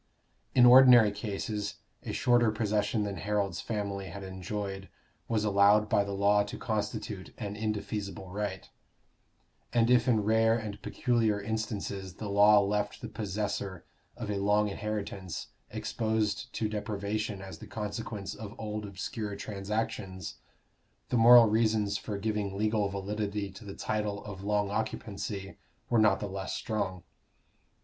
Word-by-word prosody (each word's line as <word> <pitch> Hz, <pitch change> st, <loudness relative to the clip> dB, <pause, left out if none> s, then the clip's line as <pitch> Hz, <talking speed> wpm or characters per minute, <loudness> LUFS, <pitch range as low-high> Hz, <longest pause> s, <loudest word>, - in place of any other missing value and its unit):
In 125 Hz, -, +8 dB
ordinary 125 Hz, -3 st, +9 dB
cases 105 Hz, 0 st, -3 dB, 0.3 s
a -, -, -5 dB
shorter 120 Hz, -2 st, +3 dB
possession 105 Hz, 0 st, 0 dB
than 100 Hz, -1 st, -3 dB
Harold's 100 Hz, -3 st, -1 dB
family 100 Hz, -3 st, -3 dB
had 95 Hz, +3 st, -7 dB
enjoyed 95 Hz, +1 st, -5 dB, 0.4 s
was 110 Hz, -2 st, 0 dB
allowed 105 Hz, +1 st, +4 dB
by 100 Hz, -, +3 dB
the 100 Hz, 0 st, -4 dB
law 100 Hz, +1 st, +4 dB
to 100 Hz, -, -4 dB
constitute 105 Hz, -2 st, -3 dB
an 105 Hz, -2 st, -5 dB
indefeasible 105 Hz, -3 st, -4 dB
right; 100 Hz, -2 st, -4 dB, 1.0 s
and 120 Hz, 0 st, +3 dB
if 125 Hz, -1 st, +4 dB
in 110 Hz, -4 st, +3 dB
rare 110 Hz, +1 st, +4 dB
and 105 Hz, -2 st, -6 dB
peculiar 115 Hz, -4 st, +1 dB
instances 100 Hz, -3 st, -4 dB
the 105 Hz, -2 st, -5 dB
law 105 Hz, +1 st, +7 dB
left 105 Hz, +1 st, -1 dB
the 115 Hz, -, -5 dB
possessor 100 Hz, -3 st, -3 dB, 0.3 s
of 115 Hz, -3 st, -4 dB
a 100 Hz, -, -1 dB
long 105 Hz, +1 st, +3 dB
inheritance 100 Hz, -4 st, -4 dB, 0.2 s
exposed 110 Hz, -2 st, -1 dB
to 110 Hz, -, -1 dB
deprivation 105 Hz, 0 st, -3 dB
as 95 Hz, 0 st, -9 dB
the -, -, -10 dB
consequence 105 Hz, -1 st, -5 dB
of 110 Hz, 0 st, -8 dB
old 105 Hz, -1 st, -4 dB
obscure 100 Hz, +2 st, -4 dB
transactions, 100 Hz, -2 st, -4 dB, 0.7 s
the -, -, 0 dB
moral 120 Hz, +1 st, +9 dB
reasons 110 Hz, -2 st, +2 dB
for 105 Hz, 0 st, -4 dB
giving 105 Hz, -1 st, -2 dB
legal 105 Hz, -1 st, +1 dB
validity 100 Hz, 0 st, -3 dB
to 100 Hz, +4 st, -12 dB
the 100 Hz, -1 st, -8 dB
title 105 Hz, -1 st, -2 dB
of 100 Hz, -2 st, -7 dB
long 105 Hz, -1 st, +1 dB
occupancy 100 Hz, -2 st, -4 dB, 0.3 s
were 120 Hz, -, +4 dB
not 105 Hz, -3 st, +4 dB
the 105 Hz, -, -3 dB
less 95 Hz, 0 st, -4 dB
strong. 95 Hz, -5 st, -3 dB
105 Hz, 140 wpm, -30 LUFS, 100-110 Hz, 1.0 s, ordinary